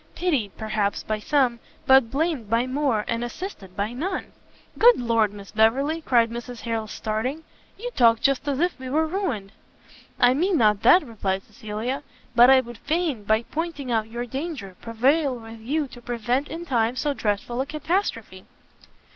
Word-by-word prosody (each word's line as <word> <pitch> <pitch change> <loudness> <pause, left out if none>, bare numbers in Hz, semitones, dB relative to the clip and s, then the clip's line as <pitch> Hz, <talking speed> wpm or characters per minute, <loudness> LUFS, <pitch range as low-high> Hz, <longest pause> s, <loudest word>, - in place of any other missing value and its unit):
pitied, 290 - 0
perhaps, 215 -2 -1
by 215 0 -2
some, 250 -1 +1 0.3
but 265 -3 +6
blamed 285 -5 -1
by 230 +2 +2
more, 255 -5 0
and 230 0 -1
assisted 240 - -7
by 205 +3 -2
none!" 355 +10 -3 0.5
"Good 480 +2 +7
Lord, 230 -3 +2
Miss 200 -1 -11
Beverley!" 270 +9 +2
cried 235 -6 +3
Mrs 240 0 -7
Harrel, 225 -2 -2
starting, 230 +9 -3 0.3
"you - - -5
talk 230 - +4
just 275 +2 +1
as 280 -1 0
if 350 -3 0
we 260 0 -6
were 310 +4 +2
ruined!" 310 - -3 0.7
"I 245 +1 +6
mean 350 +6 +1
not 210 -4 +3
that," 350 +4 +6
replied 195 -5 -2
Cecilia, 220 +3 -5 0.3
"but 240 +2 +8
I 265 -1 +7
would 240 -2 -11
fain, 310 - -1
by 220 +2 +2
pointing 300 -3 -4
out 220 -1 0
your 240 +2 -4
danger, 265 - -5
prevail 265 +5 +1
with 225 0 -11
you 290 +7 -1
to 245 - -12
prevent 240 +4 -1
in 330 +3 -6
time 240 -4 +1
so 290 +2 0
dreadful 220 +1 -2
a 270 - -3
catastrophe." 305 - -2
245 Hz, 170 wpm, -24 LUFS, 220-295 Hz, 0.7 s, but